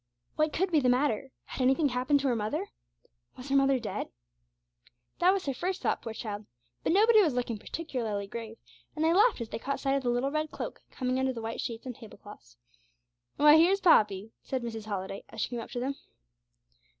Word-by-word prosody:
What 310 0 +2
could 370 +4 0
be 315 - +4
the 255 -3 +2
matter? 265 0 +1
Had - - -6
anything 270 +4 +3
happened 255 +3 +1
to 275 - 0
her 245 - +2
mother? 215 -1 -2 0.7
Was 255 +2 -9
her 275 - +1
mother 275 -1 +4
dead? 230 -4 -4 1.1
That 355 - +5
was 390 -1 -1
her 275 - -1
first 365 +8 -3
thought, - - 0
poor 225 - -6
child. 210 -2 -6 0.4
But - - +1
nobody 435 +4 +6
was 310 -10 +1
looking 240 -3 -2
particularly 225 -8 -4
grave, 225 +2 -7 0.4
and 310 0 0
they 325 - +4
laughed 420 - +4
as 230 - -5
they - - -5
caught 275 +4 -3
sight 270 -1 0
of 275 - +1
the 245 - -1
little 245 +3 0
red 305 +1 -1
cloak - - -6
coming 255 0 -2
under 260 0 +1
the 230 - -6
white 225 +1 -3
sheets 230 +1 -5
and 250 -2 -5
table 225 -4 -13
cloths. - - -14 0.8
'Why, 300 +1 +7
here's 365 +5 +5
Poppy!' 215 - +4
said 260 -2 -3
Mrs. 225 -2 -5
Holliday, 195 -1 -4
as 225 - -10
she - - 0
came 240 -1 -4
up 230 - -7
to 245 - -4
them. 265 +3 -1
255 Hz, 210 wpm, -29 LUFS, 225-300 Hz, 1.1 s, Why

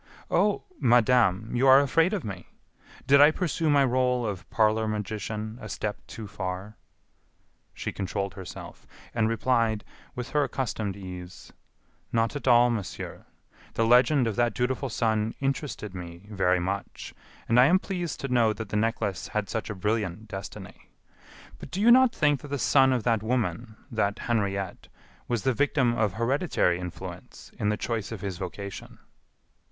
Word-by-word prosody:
"Oh! 200 +4 +2 0.2
Madame, 115 -3 +3
you 130 +3 +3
are 135 +1 +9
afraid 165 +6 +3
of 205 -5 -2
me! 95 -4 -7 0.6
Did 140 +2 +6
I 145 - +9
pursue 160 -1 -1
my 140 -2 +5
role 125 -1 +1
of 100 -4 -5
parlor 110 0 +2
magician 110 +1 -4
a 110 - -7
step 105 0 -3
too 110 - -8
far?" 95 +1 -5 1.0
She - - -4
controlled 100 -1 -3
herself, 95 +1 -10 0.3
and 115 -1 +1
replied, 115 -2 +1 0.3
with 125 -2 -5
her 150 -1 +2
accustomed 110 -7 -3
ease: 90 -2 -9 0.6
"Not 115 +3 +1
at 145 - -5
all, 120 0 +6
monsieur. 110 -5 -5 0.5
The 115 - +2
legend 125 +3 +5
of 110 -3 -1
that 120 0 +1
dutiful 130 +2 -1
son 110 -1 0
interested 135 -7 -3
me 85 0 -9
very 90 -3 +2
much, 95 +3 -4 0.3
and 115 +2 +4
I 125 - +8
am 180 +5 +5
pleased 180 -3 -4
to 135 - -2
know 120 -4 +3
that 110 +1 -8
my 105 - +2
necklace 110 -4 -1
had 105 -2 -3
such 110 - -3
a 105 - -4
brilliant 105 0 -2
destiny. 95 -1 -9 0.7
But - - -9
do 190 - -4
you 225 +3 +6
not 260 0 +7
think 145 - +1
that 150 - -9
the 140 0 -2
son 135 +1 +4
of 125 -4 0
that 115 -3 +2
woman, 110 -2 -2 0.2
that 105 -3 0
Henriette, 100 -5 -2 0.4
was 120 -4 -1
the 130 - +2
victim 135 -2 +2
of 105 -4 +1
hereditary 115 - +1
influence 90 -1 -9
in 105 - +1
the 105 - 0
choice 115 -3 -3
of 110 -4 -6
his 95 -3 -4
vocation?" 100 +1 -7
115 Hz, 165 wpm, -27 LUFS, 100-130 Hz, 1.0 s, are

